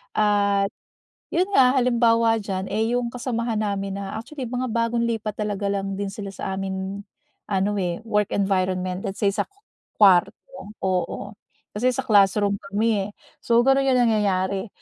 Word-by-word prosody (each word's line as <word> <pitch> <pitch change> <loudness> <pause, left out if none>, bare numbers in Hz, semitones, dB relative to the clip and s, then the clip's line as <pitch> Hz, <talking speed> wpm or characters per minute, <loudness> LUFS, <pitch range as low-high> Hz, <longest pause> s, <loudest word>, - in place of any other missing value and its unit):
at 200 -1 +2 0.6
yun 365 +2 +2
nga, 255 -1 +6
halimbawa 230 -2 +3
diyan 190 -1 -3
eh 220 +3 0
yung 245 -1 0
kasamahan 235 -1 -3
namin 200 -2 -2
na, 195 -1 -5
actually, 270 +4 -7
mga 250 +2 -3
bagong 230 +1 0
lipat 215 -2 -3
talaga 205 -1 -1
lang 195 0 -3
din 200 -1 -3
sila 205 -1 -6
sa 190 0 -5
amin, 190 +1 -4 0.5
ano 195 0 +1
eh, 180 +3 -2
work 210 -2 0
environment. 185 -2 0
Let's 195 +2 -5
say 200 - +4
sa - - -1
ku 400 - -37 0.4
kuwarto, 190 -4 +5 0.5
oo, 185 +2 -2 0.4
kasi 240 +5 +1
sa - - -2
classroom 200 -1 +3
kami 210 -1 +1
eh. - - -10 0.3
So 235 - +2
gano'n 270 +1 +3
yung 255 -1 +4
nangyayari. 195 -1 0
205 Hz, 160 wpm, -23 LUFS, 195-230 Hz, 0.6 s, nga